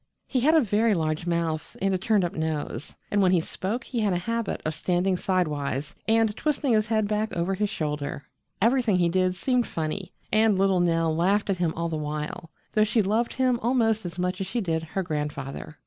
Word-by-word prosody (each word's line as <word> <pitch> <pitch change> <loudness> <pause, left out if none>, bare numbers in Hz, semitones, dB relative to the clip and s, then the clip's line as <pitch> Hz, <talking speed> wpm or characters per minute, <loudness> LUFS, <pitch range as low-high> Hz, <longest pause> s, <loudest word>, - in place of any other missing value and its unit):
He 260 - 0
had 305 +6 +4
a 320 - +6
very 215 -1 +2
large 155 0 -1
mouth 165 -2 -2
and 195 0 +1
a - - +2
turned 205 -1 +2
up 170 - -3
nose, 155 -5 -3 0.2
and 205 - +3
when 185 -2 +4
he 180 - +4
spoke 200 +8 -3
he 240 - -4
had 210 -4 +2
a - - +1
habit 230 +4 -2
of 155 - 0
standing 180 +3 +1
sidewise 150 -6 -1
and 225 -1 +3
twisting 290 -3 0
his 215 0 +2
head 215 -2 +1
back 215 +1 -1
over 175 +3 0
his 205 +2 0
shoulder. 150 -3 -3 0.3
Everything 230 -1 +3
he 175 -1 +3
did 185 +1 +1
seemed 250 +5 +1
funny, 165 +4 -4 0.2
and 215 -2 +4
little 190 -1 +3
Nell 165 -2 +2
laughed 195 +5 +2
at 185 - -2
him 170 -2 +1
all 170 0 -1
the 160 -1 -2
while, 150 +2 -4 0.2
though 215 - +3
she 215 +1 +2
loved 220 +5 0
him 255 -2 +1
almost 225 -2 +2
as 175 -1 -6
much 180 +1 -1
as 190 - -2
she 235 +6 -2
did 165 -6 -1
her 175 +4 -3
grandfather. 150 -2 -4
185 Hz, 210 wpm, -26 LUFS, 165-220 Hz, 0.3 s, a